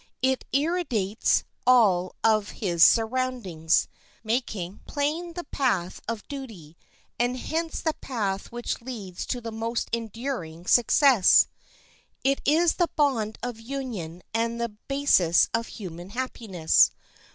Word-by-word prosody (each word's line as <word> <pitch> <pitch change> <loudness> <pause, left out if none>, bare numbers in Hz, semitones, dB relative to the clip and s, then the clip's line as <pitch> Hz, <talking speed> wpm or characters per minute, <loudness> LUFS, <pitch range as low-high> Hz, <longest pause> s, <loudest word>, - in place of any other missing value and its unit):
It 260 0 +1
irradiates 275 - +1 0.2
all 195 -8 +4
of 215 -2 +3
his 175 -6 +2
surroundings, 225 -9 +2 0.4
making 215 -5 -2
plain 310 +4 -2
the 350 +1 -5
path 195 - -1
of 230 -2 -4
duty, 220 - -9 0.4
and 245 +1 +1
hence 325 +5 -3
the 315 - 0
path 205 -9 -3
which 240 0 -4
leads 215 -8 -7
to 250 - -2
the 230 -1 -6
most 225 +1 -3
enduring 225 -7 -4
success. 240 -2 +5 0.7
It 275 +1 +1
is 325 +3 +3
the 345 -2 +2
bond 245 -8 +1
of 245 -2 -4
union 225 -10 -6
and 230 +1 -1
the 235 0 -1
basis 210 -6 +2
of 230 +1 0
human 175 -3 -8
happiness. 215 -8 +2
230 Hz, 120 wpm, -26 LUFS, 195-265 Hz, 0.7 s, success